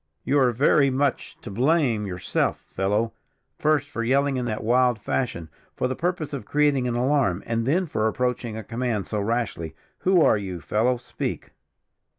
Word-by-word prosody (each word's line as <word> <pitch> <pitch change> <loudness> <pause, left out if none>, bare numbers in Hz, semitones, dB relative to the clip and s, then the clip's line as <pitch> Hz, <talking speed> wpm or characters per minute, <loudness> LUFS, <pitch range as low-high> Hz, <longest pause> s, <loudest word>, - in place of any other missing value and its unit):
"You 140 +2 +2
are 130 -2 +4
very 140 +3 +4
much 135 0 -1
to - - -8
blame 125 -2 +2
yourself, 90 -1 -1
fellow; 105 +4 0 0.5
first, 150 -2 +2
for 115 -4 -4
yelling 135 +3 +2
in 125 -1 -1
that 110 -2 -3
wild 125 +1 +3
fashion, 105 -8 -2 0.3
for - - 0
the 130 - -3
purpose 165 -3 -2
of 140 - -4
creating 145 0 +2
an 120 - -1
alarm, 125 -7 +1
and 115 0 -1
then 180 +7 +2
for 110 -8 0
approaching 120 -1 -2
a 110 - -5
command 115 -2 -2
so 105 - -3
rashly. 105 -7 -2 0.2
Who 185 -3 +4
are - - +4
you, 95 -3 -5
fellow, 120 +8 +1
speak?" 120 - -5
125 Hz, 170 wpm, -24 LUFS, 110-140 Hz, 0.5 s, are